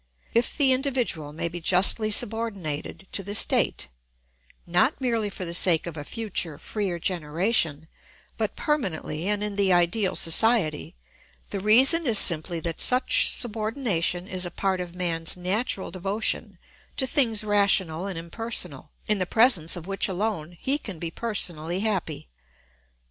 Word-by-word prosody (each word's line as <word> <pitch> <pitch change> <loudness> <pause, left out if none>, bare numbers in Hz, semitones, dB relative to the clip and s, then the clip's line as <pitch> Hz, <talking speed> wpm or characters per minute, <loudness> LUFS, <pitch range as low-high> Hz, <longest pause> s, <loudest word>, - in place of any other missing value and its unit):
If 235 +1 +1
the 275 -3 +5
individual 250 - -1
may 160 +3 -4
be 175 +1 -7
justly 190 +5 +4
subordinated 200 -7 -2
to - - -2
the 200 +2 -4
state, - - +2 0.8
not 175 +1 +1
merely 230 -5 -1
for 190 -2 -6
the 170 - -5
sake 170 -2 +4
of 170 -2 -7
a 145 - -6
future 185 -6 -3
freer 190 +1 -4
generation, 165 -1 -1 0.5
but - - -3
permanently 190 - -2
and 205 0 0
in 205 -1 -5
the 195 -2 +2
ideal 180 +3 +1
society, 170 -3 +2 0.6
the 200 - -3
reason 265 - +5
is 225 -3 +4
simply 170 -1 +4
that 165 0 -5
such 265 - +4
subordination 215 -6 -2
is 185 -2 -4
a 175 - -4
part 190 0 -2
of 175 -1 -8
man's 170 -2 -2
natural 190 +3 -2
devotion 200 +2 -2 0.4
to 265 - 0
things 235 -5 +1
rational 200 -4 +1
and 190 -4 -5
impersonal, 170 - -2 0.2
in 210 -1 0
the 185 - -1
presence 220 -9 +3
of 175 -2 -8
which 195 +1 0
alone 180 -4 -4
he 280 +2 0
can 200 - -8
be 165 0 -5
personally 175 -5 -2
happy. 190 - -3
190 Hz, 150 wpm, -25 LUFS, 170-225 Hz, 0.8 s, the